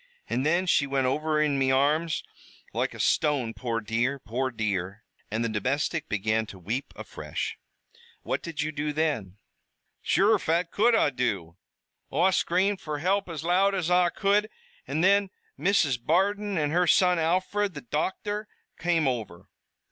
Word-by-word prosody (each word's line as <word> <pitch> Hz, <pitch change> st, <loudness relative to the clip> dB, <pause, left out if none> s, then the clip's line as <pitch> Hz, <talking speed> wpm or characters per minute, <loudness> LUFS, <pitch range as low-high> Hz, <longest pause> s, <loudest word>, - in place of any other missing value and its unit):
An' 130 Hz, -, -1 dB
thin 170 Hz, +5 st, +2 dB
she 145 Hz, -5 st, +3 dB
wint 135 Hz, -1 st, 0 dB
over 155 Hz, +4 st, 0 dB
in 150 Hz, -2 st, +2 dB
me 135 Hz, -1 st, +2 dB
arms 150 Hz, +5 st, +2 dB, 0.5 s
loike -, -, -1 dB
a -, -, -10 dB
stone, 140 Hz, -7 st, +1 dB
poor 115 Hz, -2 st, -2 dB
dear, 115 Hz, +5 st, -1 dB
poor 130 Hz, +1 st, -2 dB
dear!" 105 Hz, -3 st, -3 dB, 0.3 s
And 110 Hz, +2 st, -1 dB
the -, -, +1 dB
domestic 135 Hz, +8 st, -1 dB
began 110 Hz, +2 st, 0 dB
to 100 Hz, -, -10 dB
weep 110 Hz, +10 st, -4 dB
afresh. -, -, -5 dB, 0.6 s
"What -, -, -2 dB
did 160 Hz, -3 st, -4 dB
you 155 Hz, -, -2 dB
do 150 Hz, 0 st, -3 dB
then?" 145 Hz, -, -1 dB, 0.6 s
"Sure, 210 Hz, +1 st, +3 dB
phat 170 Hz, +1 st, 0 dB
could 230 Hz, +3 st, +3 dB
Oi 145 Hz, -, +3 dB
do? 100 Hz, -10 st, -2 dB, 0.6 s
Oi 175 Hz, +7 st, +3 dB
scr'amed 190 Hz, +2 st, +1 dB
fer 150 Hz, -1 st, -4 dB
hilp 190 Hz, +5 st, 0 dB
as 160 Hz, -2 st, -5 dB
loud 190 Hz, +4 st, +3 dB
as 180 Hz, -2 st, -1 dB
Oi 180 Hz, 0 st, +4 dB
could, 205 Hz, +3 st, +1 dB, 0.4 s
an' 160 Hz, -, -1 dB
thin 200 Hz, +1 st, +4 dB, 0.3 s
Mrs. 145 Hz, -8 st, +2 dB
Bardon 200 Hz, +3 st, +1 dB
an' 150 Hz, -2 st, 0 dB
her 175 Hz, +2 st, +2 dB
son, 180 Hz, 0 st, +4 dB
Alfred, 185 Hz, +3 st, 0 dB
the 145 Hz, -, -7 dB
docthor, 205 Hz, -, -2 dB, 0.3 s
came 165 Hz, -4 st, +1 dB
over." 110 Hz, -9 st, -4 dB
155 Hz, 160 wpm, -27 LUFS, 125-180 Hz, 0.6 s, Oi